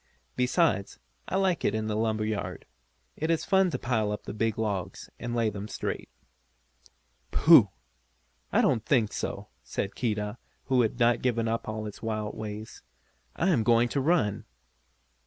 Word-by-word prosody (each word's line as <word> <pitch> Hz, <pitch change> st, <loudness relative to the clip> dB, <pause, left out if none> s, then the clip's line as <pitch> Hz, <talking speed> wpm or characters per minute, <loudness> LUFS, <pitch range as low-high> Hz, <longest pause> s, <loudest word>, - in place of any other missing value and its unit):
Besides, 125 Hz, -, +1 dB, 0.3 s
I -, -, -2 dB
like 190 Hz, -3 st, +1 dB
it 105 Hz, -, +1 dB
in 110 Hz, 0 st, -1 dB
the 110 Hz, -1 st, -2 dB
lumber 110 Hz, -1 st, 0 dB
yard. 110 Hz, -1 st, -4 dB, 0.5 s
It 160 Hz, -, -2 dB
is 165 Hz, -1 st, +1 dB
fun 190 Hz, -1 st, +4 dB
to -, -, -2 dB
pile 110 Hz, -5 st, 0 dB
up 105 Hz, -, -4 dB
the -, -, -6 dB
big 110 Hz, 0 st, -1 dB
logs, 100 Hz, -5 st, -3 dB
and 120 Hz, 0 st, -4 dB
lay 115 Hz, -2 st, +1 dB
them 100 Hz, +1 st, -6 dB
straight." 110 Hz, -, -4 dB, 1.2 s
"Pooh! -, -, +7 dB, 0.8 s
I -, -, +4 dB
don't 115 Hz, -, +2 dB
think 115 Hz, -5 st, +2 dB
so," -, -, -4 dB
said 100 Hz, -, -4 dB
Keedah, 105 Hz, -1 st, -2 dB, 0.3 s
who 130 Hz, -2 st, +3 dB
had 115 Hz, 0 st, 0 dB
not 120 Hz, 0 st, +3 dB
given 115 Hz, -2 st, +1 dB
up 115 Hz, 0 st, -2 dB
all 110 Hz, 0 st, -4 dB
his 105 Hz, -, -8 dB
wild 110 Hz, -2 st, -3 dB
ways. 110 Hz, 0 st, -7 dB, 0.5 s
"I 180 Hz, -, +1 dB
am 160 Hz, -11 st, +3 dB
going 115 Hz, +2 st, +3 dB
to 140 Hz, -, 0 dB
run!" 130 Hz, -, +1 dB
110 Hz, 165 wpm, -28 LUFS, 105-125 Hz, 1.2 s, Pooh